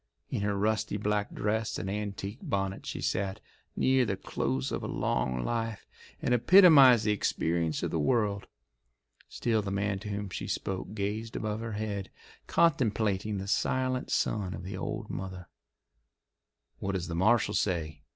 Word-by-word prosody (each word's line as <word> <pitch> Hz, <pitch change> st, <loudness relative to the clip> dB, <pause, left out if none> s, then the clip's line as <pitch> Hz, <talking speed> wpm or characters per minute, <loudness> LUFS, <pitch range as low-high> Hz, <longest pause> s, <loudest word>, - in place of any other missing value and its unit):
In -, -, -1 dB
her 100 Hz, 0 st, 0 dB
rusty 110 Hz, 0 st, 0 dB
black 105 Hz, 0 st, -1 dB
dress 110 Hz, +1 st, -1 dB
and -, -, -4 dB
antique 100 Hz, +2 st, -4 dB
bonnet 95 Hz, -1 st, -2 dB
she -, -, -4 dB
sat, 95 Hz, 0 st, -1 dB, 0.4 s
near 130 Hz, 0 st, +3 dB
the 100 Hz, -5 st, -1 dB
close 65 Hz, -7 st, -2 dB
of -, -, -2 dB
a -, -, -4 dB
long 65 Hz, -1 st, -1 dB
life, 115 Hz, -2 st, -2 dB, 0.4 s
and 125 Hz, -, +2 dB
epitomised 135 Hz, -, +7 dB
the 105 Hz, -, +3 dB
experience 85 Hz, -5 st, 0 dB
of -, -, -1 dB
the 80 Hz, -, 0 dB
world. 100 Hz, -, +1 dB, 0.8 s
Still 115 Hz, -2 st, 0 dB
the 100 Hz, -, -4 dB
man 100 Hz, 0 st, -1 dB
to 105 Hz, -, -7 dB
whom 100 Hz, -1 st, -4 dB
she -, -, -4 dB
spoke 95 Hz, +2 st, -3 dB
gazed 110 Hz, +2 st, -3 dB
above 110 Hz, 0 st, -2 dB
her 115 Hz, -1 st, -5 dB
head, 105 Hz, -2 st, -3 dB, 0.4 s
contemplating 110 Hz, -, +2 dB
the 95 Hz, 0 st, -5 dB
silent 130 Hz, +4 st, 0 dB
son 100 Hz, -4 st, 0 dB
of -, -, -8 dB
the 95 Hz, +1 st, -5 dB
old 95 Hz, -, -4 dB
mother. 95 Hz, -1 st, -6 dB, 1.3 s
"What 100 Hz, -, -2 dB
does 90 Hz, -3 st, -2 dB
the 85 Hz, -, -4 dB
marshal 105 Hz, +4 st, +3 dB
say?" 80 Hz, -8 st, -1 dB
105 Hz, 160 wpm, -30 LUFS, 95-110 Hz, 1.3 s, epitomised